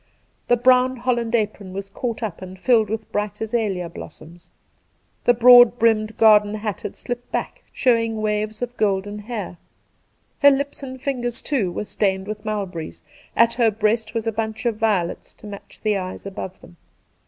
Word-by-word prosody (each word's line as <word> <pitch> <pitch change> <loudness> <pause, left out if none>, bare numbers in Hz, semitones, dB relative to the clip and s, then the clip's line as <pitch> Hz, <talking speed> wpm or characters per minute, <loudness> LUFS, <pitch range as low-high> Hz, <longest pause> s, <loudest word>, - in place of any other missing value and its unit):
The 245 - +4
brown 255 +1 +4
holland 240 -2 -1
apron 210 -4 -2
was 195 +1 -5
caught 235 +2 -4
up 200 -6 -4
and 185 0 -9
filled 220 0 +3
with 220 0 -5
bright 210 0 -3
azalea 215 -5 -1
blossoms. 170 0 -12 0.8
The 245 - +6
broad 245 0 +8
brimmed 220 -1 +1
garden 210 -1 +5
hat 210 -3 -4
had - - -7
slipped 245 -1 -6
back, - - -3
showing 230 -3 +1
waves 215 +1 -2
of 245 0 -5
golden 205 0 0
hair; 210 -5 -6 0.8
her 285 - +8
lips 280 +1 -1
arid 260 -2 -8
fingers, 245 -4 0
too, 230 -12 0
were 210 - -4
stained 190 -1 -1
with 210 0 -6
mulberries; 195 -7 -5 0.3
at 230 0 +4
her 235 -2 +3
breast 215 +1 -1
was 225 -1 -2
a 225 - 0
bunch 220 +1 -4
of 230 -3 0
violets 205 -6 -1
to - - -16
match 205 -1 -11
the 215 -1 +2
eyes 185 0 -5
above 190 -1 -7
them. 175 - -16
215 Hz, 170 wpm, -22 LUFS, 205-240 Hz, 0.8 s, broad